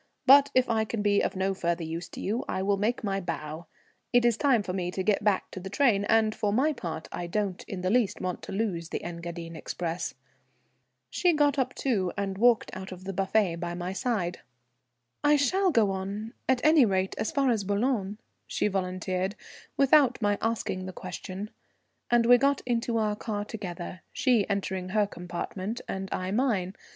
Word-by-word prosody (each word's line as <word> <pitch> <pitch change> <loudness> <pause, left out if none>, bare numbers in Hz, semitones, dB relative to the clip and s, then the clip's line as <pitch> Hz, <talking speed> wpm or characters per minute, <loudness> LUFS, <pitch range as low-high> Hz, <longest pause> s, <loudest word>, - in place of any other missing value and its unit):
But 280 +2 +8
if 255 0 +4
I 225 -2 +2
can 220 -1 -3
be 205 -1 +3
of - - -1
no 190 +1 0
further 170 -2 -1
use 165 +2 -5
to - - -9
you 220 +6 -1
I 190 - -1
will 200 +1 +2
make 220 +5 0
my 195 -2 0
bow. 165 -1 -5 0.4
It 245 -1 +4
is 235 -2 +4
time 245 -3 +3
for 180 - -4
me 180 -2 -2
to 185 +1 -3
get 205 0 +1
back 205 -2 +1
to - - -6
the 190 +1 -7
train, 210 -4 +3
and 220 0 +3
for 205 -1 -1
my 275 +8 +2
part 160 - -5
I 175 - -4
don't 195 0 -2
in 190 -2 -5
the 185 +1 0
least 235 -3 +2
want 185 -1 -3
to - - -8
lose 190 -5 -2
the - - -4
Engadine 170 -1 -6
express." 170 +2 -4 1.0
She 355 -1 +3
got 290 -2 +3
up 255 0 -1
too, 200 -9 0
and 195 -1 -2
walked 240 0 +4
out 190 0 -7
of 185 0 -9
the 195 +1 -4
buffet 190 -2 +1
by 175 0 -4
my 180 +1 -4
side. 195 -6 -1 0.8
"I 295 0 +5
shall 370 +8 +2
go 225 - +3
on, 200 +4 -4 0.2
at 260 +1 +2
any 310 -2 +7
rate 190 -3 +1
as - - -1
far 275 -3 +2
as 220 -4 0
Boulogne," 205 0 0 0.3
she - - 0
volunteered, 185 0 -2 0.4
without 275 -2 +5
my 205 -2 +1
asking 210 -5 -2
the 185 - -6
question; 185 +3 -6 0.6
and 240 -1 +4
we 245 +1 +7
got 280 +1 +2
into 235 -1 0
our 215 -2 +1
car 210 -1 -4
together, 185 -4 -6
she 240 -8 +2
entering 190 -2 -2
her 210 +1 +2
compartment 185 +4 -5
and 190 0 -4
I 185 0 -2
mine. 205 -6 +1
200 Hz, 195 wpm, -28 LUFS, 185-235 Hz, 1.0 s, But